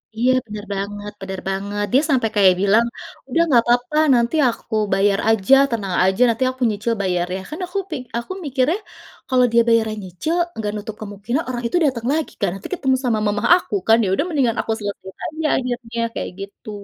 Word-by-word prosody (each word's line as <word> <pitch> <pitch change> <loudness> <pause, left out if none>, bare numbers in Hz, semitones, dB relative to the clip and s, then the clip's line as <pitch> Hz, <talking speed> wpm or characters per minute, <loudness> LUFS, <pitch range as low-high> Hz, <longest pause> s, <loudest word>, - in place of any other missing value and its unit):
Iya, 245 +3 +2
benar 210 -1 -7
banget 205 +1 -5
benar 190 -1 -5
banget. 200 +2 -2
Dia 270 - +6
sampai 250 -6 +2
kayak 190 -3 +6
bilang, 215 +4 +4 0.4
"Udah, 330 +6 +2
enggak 255 -8 +4
apa-apa, 245 +6 +1 0.2
nanti 235 +5 +1
aku 230 -1 -5 0.2
bayar 195 0 +2
aja, 225 +4 +5 0.2
tenang 200 -6 -2
aja, 190 +5 +1
nanti 230 +3 0
aku 260 0 -17
nyicil 215 +2 -1
bayarnya." 180 0 -1
Kan 310 - -7
aku 380 - -5
pik 305 -6 -4 0.2
aku 235 +10 -5
mikirnya, 275 +5 +1 0.5
kalau 255 -1 +4
dia 235 0 +5
bayarnya 225 -2 +2
nyicil, 185 - -3 0.2
enggak 210 -2 -3
nutup 210 +1 -6
kemungkinan 215 +8 -3
orang 240 -1 -3
itu 355 - 0
datang 240 -4 -1
lagi, 315 0 -1
kan? - - +2
Nanti 195 - -8
ketemu 265 -7 +1
sama 230 -3 +1
mamah 205 0 0
aku, 345 - -5
kan? 225 +1 +6
Ya - - 0
udah 245 - +1
mendingan 260 -8 +1
aku - - -4
selesaikan 200 -2 -7
aja 315 0 -5
akhirnya, 245 -2 -4 0.2
kayak - - -3
gitu. 200 +2 -9
230 Hz, 195 wpm, -20 LUFS, 205-255 Hz, 0.5 s, Dia